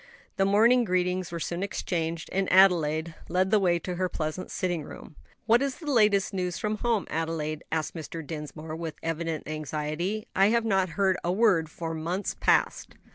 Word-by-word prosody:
The 195 - +3
morning 230 +5 +5
greetings 180 -2 0
were 170 - -4
soon 170 +2 -3
exchanged, 170 -4 -2
and 195 0 0
Adelaide 170 -4 +4 0.2
led 185 +2 +1
the 215 - +5
way 175 -3 +3
to 175 +1 -5
her 185 0 0
pleasant 155 +3 -4
sitting 175 -3 -2
room. 150 - -11 0.3
"What 230 +2 +4
is 275 -2 -1
the 305 -4 -4
latest 210 -4 +3
news 180 -2 -2
from 215 0 -2
home, 230 -3 0
Adelaide?" 155 -1 -2
asked 160 -1 -1
Mr. 160 0 -7
Dinsmore, 155 +1 -6
with 165 -1 -5
evident 165 -1 -3
anxiety. 155 +7 -3
"I 195 +1 +5
have 230 +1 +2
not 190 -4 +2
heard 190 -2 +3
a 175 - 0
word 185 -6 +3
for 165 0 -5
months 170 +5 -2
past." - - +1
180 Hz, 180 wpm, -27 LUFS, 160-195 Hz, 0.3 s, morning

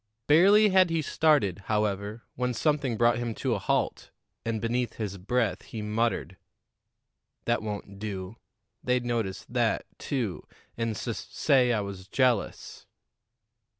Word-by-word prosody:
Barely 200 +8 +6
had 185 -2 +5
he 165 -1 0
started, 145 - +2
however, 105 +1 -1
when 125 0 -1
something 140 -3 +1
brought 120 +1 +3
him 120 -2 -3
to 130 -3 -1
a 105 - -1
halt, - - -1 0.3
and 115 -1 -1
beneath 120 +2 -1
his 100 -3 -5
breath 105 -1 0
he 110 -2 -7
muttered: 105 -4 -1 1.1
"That 120 0 +1
won't 100 -2 -6
do. 100 0 -5 0.5
They'd 125 -1 +1
notice 115 -6 -2
that, - - 0
too, 120 -10 -3 0.3
and 115 -2 -2
sus - - -4
say 125 -3 +3
I 110 -3 +1
was 100 -2 -7
jealous." 125 -1 0
115 Hz, 135 wpm, -28 LUFS, 105-125 Hz, 1.1 s, Barely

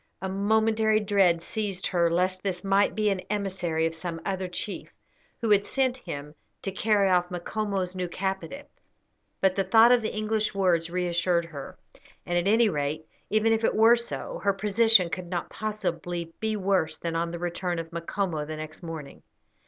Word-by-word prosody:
A 190 - -3
momentary 220 +2 +2
dread 195 -5 +3
seized 200 -4 -2
her 170 -2 +2
lest 185 +2 +1
this 185 -2 -3
might 195 +1 +2
be 215 -1 +2
an 195 - -1
emissary 185 -6 -1
of 165 - -1
some 165 0 -5
other 190 -1 -2
chief, 185 +3 -5 0.5
who 225 -2 0
had 205 -1 +5
sent 260 +3 0
him 145 - -7 0.3
to 195 - -2
carry 205 0 +2
off 180 -1 +2
Macomo's 190 +1 -3
new 180 -1 -2
captive, 195 +10 -4 0.8
but 190 -1 +3
the 195 - +1
thought 225 +5 +6
of 245 -1 +5
the 220 - -2
English 215 0 -1
words 175 -4 +2
reassured 175 -1 0
her; 150 -5 -9 0.5
and, 175 - -2
at 175 +2 +1
any 225 +1 +5
rate, 150 -2 -2 0.2
even 215 +1 +3
if 225 0 0
it - - +2
were 225 +2 +7
so, 235 0 -5
her 200 -1 +3
position 210 -1 +4
could 175 +1 -5
not 175 -1 -4
possibly 175 -6 -3
be 220 0 -1
worse 195 -5 0
than 165 -1 -4
on 170 +1 0
the 170 - -5
return 175 0 -2
of 165 0 -5
Macomo 170 -1 -2
the 155 +1 -6
next 155 +2 -8
morning. 160 -4 -8
190 Hz, 180 wpm, -27 LUFS, 170-215 Hz, 0.8 s, were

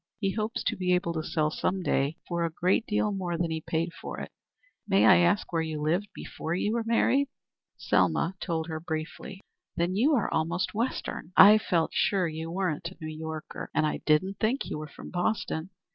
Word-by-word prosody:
He 195 -3 0
hopes 215 +1 -2
to - - 0
be 180 -1 +2
able 170 -1 -1
to 160 - -2
sell 155 -1 0
some 185 +3 -1
day 140 -1 0
for 170 -1 -1
a 165 - +1
great 180 +7 +1
deal 210 0 +1
more 180 -4 -2
than 170 -1 -1
he 160 0 -2
paid 165 +2 -2
for - - -7
it. - - -7 0.6
May 195 -1 +4
I - - +8
ask 175 +2 +2
where 165 - +2
you 160 -1 -3
lived 170 +7 0
before 160 - -4
you 205 +4 0
were 235 -1 0
married?" 255 +5 +2 0.5
Selma 170 - +2
told 165 -3 -2
her 160 -1 -4
briefly. 160 +4 -6 0.3
"Then 175 +2 0
you 280 +9 +4
are 230 - 0
almost 165 +3 0
Western. 220 -5 -3
I 210 +2 +9
felt 170 -6 0
sure 190 -4 +2
you 160 +1 -5
weren't 170 -2 -2
a 185 - -15
New 155 -1 -6
Yorker, 160 0 -6
and 155 - +3
I 150 - 0
didn't 185 +6 +2
think 235 +5 +1
you - - -4
were 155 - -6
from 145 - -11
Boston. 175 -2 -1
175 Hz, 205 wpm, -28 LUFS, 160-195 Hz, 0.6 s, I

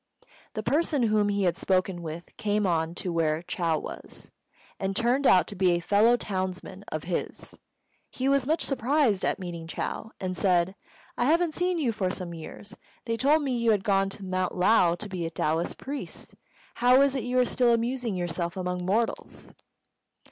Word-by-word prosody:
The 215 - -3
person 290 +1 +1
whom 215 -2 +2
he 200 -1 0
had 175 -2 +2
spoken 185 -1 0
with 165 +1 -8
came 210 -2 0
on 165 -2 0
to 180 -1 -3
where 160 -1 0
Chou 170 -4 0
was, - - -8 0.5
and 195 0 -2
turned 245 +5 +2
out 180 -3 +6
to 205 - -7
be 180 -2 +3
a 175 - +1
fellow 210 +7 +4
townsman 185 -1 -4
of 155 0 -3
his. 175 0 -4 0.5
He 260 - -2
was 275 -2 +2
much 320 +2 +1
surprised 265 -5 +1
at - - +1
meeting 170 -3 -6
Chou, 220 - -4
and 185 -1 -3
said, 180 -1 +2 0.5
"I 240 - +3
haven't 330 +3 +2
seen 360 +1 0
you 275 -8 +1
for 200 -4 -1
some 180 -2 -5
years. 200 +6 -10 0.3
They 230 -1 -1
told 290 +6 +3
me 275 - -1
you 235 -1 +1
had 205 -3 +3
gone 195 -1 +2
to 195 0 -8
Mount 185 0 -1
Lao 180 -2 +4
to 210 - -7
be 180 -4 -3
a - - -4
Taoist 160 0 -1
priest. 280 +1 -7 0.4
How 250 +2 +5
is 280 -1 +2
it 265 - -1
you 250 +1 -1
are 250 - +5
still 245 0 +3
amusing 235 -1 0
yourself 175 0 -2
among 180 -1 -2
mortals?" 215 +6 -2
200 Hz, 185 wpm, -27 LUFS, 180-245 Hz, 0.5 s, out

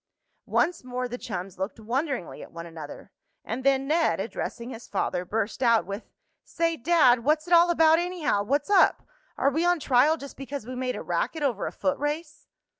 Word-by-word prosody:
Once 345 -4 +1
more 250 0 -3
the 245 +1 -6
chums 185 -3 -6
looked 190 +4 -4
wonderingly 250 - -3
at - - -11
one 170 0 -8
another, 165 +2 -10 0.3
and 235 +4 -4
then 270 0 +2
Ned, 325 +3 +2
addressing 235 +1 -5
his 235 -1 -9
father, 180 -2 -2
burst 215 +4 -2
out 235 -3 +4
with: 200 +3 -7 0.3
"Say, 330 -1 -1
Dad, 255 -5 +4
what's 305 +3 +2
it 350 - -1
all 345 +1 +7
about, 325 -1 +5
anyhow? 345 - 0
What's 285 - -1
up? 390 - +4 0.3
Are 275 - +2
we 320 +5 0
on 350 -1 +3
trial 280 +3 +3
just 280 -2 -10
because 275 -3 -6
we 255 - -6
made 255 0 -2
a - - -6
racket 320 -2 -2
over 245 -8 0
a - - -4
foot 280 0 -1
race?" 300 +1 -4
270 Hz, 190 wpm, -26 LUFS, 230-315 Hz, 0.3 s, all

